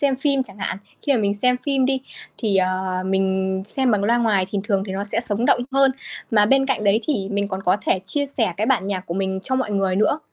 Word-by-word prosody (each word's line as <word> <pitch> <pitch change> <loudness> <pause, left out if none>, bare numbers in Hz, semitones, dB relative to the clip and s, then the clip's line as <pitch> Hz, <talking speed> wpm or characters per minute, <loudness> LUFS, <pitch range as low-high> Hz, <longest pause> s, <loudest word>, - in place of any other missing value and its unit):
xem 275 -2 +2
phim 275 0 +2
chẳng 205 -5 -12
hạn, 190 - -3 0.2
khi 285 - +2
mà 255 - +2
mình 200 -1 +1
xem 250 +4 +2
phim 270 -2 +2
đi 265 0 0 0.4
thì, 210 -4 +1
ờ, 185 0 0
mình 190 0 0
xem 260 +4 0
bằng 205 -3 +1
loa 230 +3 +3
ngoài 205 -6 +2
thì 205 - -1
thường 200 -3 +1
thì 190 - -5
nó 195 +1 -3
sẽ 205 +2 -1
sống 225 -1 -1
động 245 - +4
hơn. 275 0 +4 0.4
Mà 210 -3 +4
bên 270 +2 +3
cạnh 265 -6 -1
đấy 205 +2 +3
thì 205 -11 -1
mình 200 0 -1
còn 190 -1 -4
có 185 +1 +3
thể - - +3
chia 285 +9 -1
sẻ 230 -9 -1
cái 215 - -1
bản 240 -7 +1
nhạc 190 -2 -3
của 170 - -4
mình 190 0 -1
cho 260 - -2
mọi 260 -5 -1
người 195 -2 0
nữa. 215 +8 +2
205 Hz, 260 wpm, -22 LUFS, 190-260 Hz, 0.4 s, động